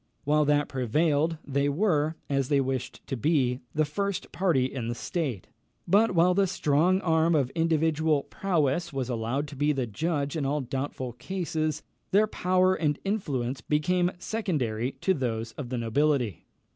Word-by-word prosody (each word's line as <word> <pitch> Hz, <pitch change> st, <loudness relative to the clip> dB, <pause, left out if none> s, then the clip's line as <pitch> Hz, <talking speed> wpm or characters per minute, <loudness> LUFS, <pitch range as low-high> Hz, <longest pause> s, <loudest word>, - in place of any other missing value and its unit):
While 150 Hz, +1 st, +3 dB
that 145 Hz, 0 st, +2 dB
prevailed, 150 Hz, +5 st, +1 dB
they 140 Hz, 0 st, +1 dB
were, 155 Hz, -2 st, +1 dB
as 135 Hz, -2 st, 0 dB
they 145 Hz, -2 st, +3 dB
wished 130 Hz, -1 st, -3 dB
to 135 Hz, -, -3 dB
be, 130 Hz, -1 st, +1 dB, 0.2 s
the 155 Hz, 0 st, +3 dB
first 200 Hz, +5 st, -3 dB
party 170 Hz, -9 st, +2 dB
in 130 Hz, -3 st, -4 dB
the 120 Hz, -, -2 dB
state; 135 Hz, -, -3 dB, 0.4 s
but 205 Hz, 0 st, +4 dB
while 175 Hz, +2 st, +5 dB
the 195 Hz, +1 st, +3 dB
strong 175 Hz, +2 st, +2 dB
arm 160 Hz, -1 st, +3 dB
of 135 Hz, -4 st, +1 dB
individual 160 Hz, -2 st, +1 dB
prowess 170 Hz, -3 st, 0 dB
was 135 Hz, -3 st, -3 dB
allowed 120 Hz, +5 st, -2 dB
to 145 Hz, -, -9 dB
be 145 Hz, +2 st, +2 dB
the 135 Hz, -3 st, -1 dB
judge 145 Hz, +5 st, -2 dB
in 155 Hz, -, -1 dB
all 145 Hz, +2 st, 0 dB
doubtful 130 Hz, -1 st, -4 dB
cases, 160 Hz, 0 st, -3 dB, 0.3 s
their 205 Hz, +3 st, +4 dB
power 185 Hz, -2 st, +2 dB
and 150 Hz, -5 st, 0 dB
influence 140 Hz, -, -2 dB
became 175 Hz, +4 st, +1 dB
secondary 135 Hz, -, -2 dB
to 190 Hz, -, +3 dB
those 115 Hz, -6 st, -2 dB
of 125 Hz, +1 st, -7 dB
the 125 Hz, -, -2 dB
nobility. 125 Hz, -, 0 dB
150 Hz, 160 wpm, -27 LUFS, 130-170 Hz, 0.4 s, while